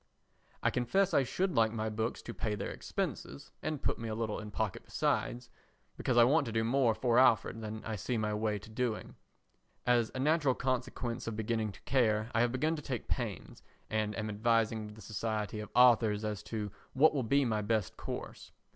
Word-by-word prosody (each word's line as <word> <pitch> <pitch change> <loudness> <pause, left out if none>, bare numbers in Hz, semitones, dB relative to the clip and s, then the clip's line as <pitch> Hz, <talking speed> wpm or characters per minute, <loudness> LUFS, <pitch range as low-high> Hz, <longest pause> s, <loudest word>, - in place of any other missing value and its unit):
I - - +3
confess 190 +11 +1
I - - +5
should 180 +8 -1
like 115 -3 +3
my 110 -1 -2
books 110 +2 -2
to - - -6
pay 105 -3 -2
their - - -4
expenses 70 +2 -4
and 155 -3 -3
put - - 0
me 115 -1 -4
a 110 - -2
little 110 -2 -2
in 105 - -7
pocket 105 -1 -2
besides—because 120 +1 -3
I 120 - +9
want 140 +3 +3
to - - -3
do 110 0 +1
more 120 -1 +3
for 120 0 +3
Alfred 115 -3 +4
than 110 0 -6
I 110 - -3
see 120 +6 -2
my 105 -1 0
way 105 0 0
to 100 - -12
doing. 115 -1 -2 0.7
As 120 -2 +3
a - - -3
natural 145 -2 +3
consequence 125 -2 -2
of 115 - -2
beginning 110 0 -1
to - - -16
care 110 -3 +1
I 115 - +3
have 120 0 +2
begun 155 +6 +1
to - - -6
take 125 -5 -4
pains, - - -4 0.3
and 105 -1 -1
am 110 - -2
advising 110 0 +1
with 105 - -11
the 110 - -13
Society 105 0 -3
of 105 -1 -6
Authors 115 -4 +5
as 105 -2 -3
to 105 -3 -3 0.2
what 150 +5 +5
will 140 - 0
be 140 +4 +2
my 110 -3 0
best 105 -1 0
course. - - -7
115 Hz, 200 wpm, -32 LUFS, 110-125 Hz, 0.7 s, I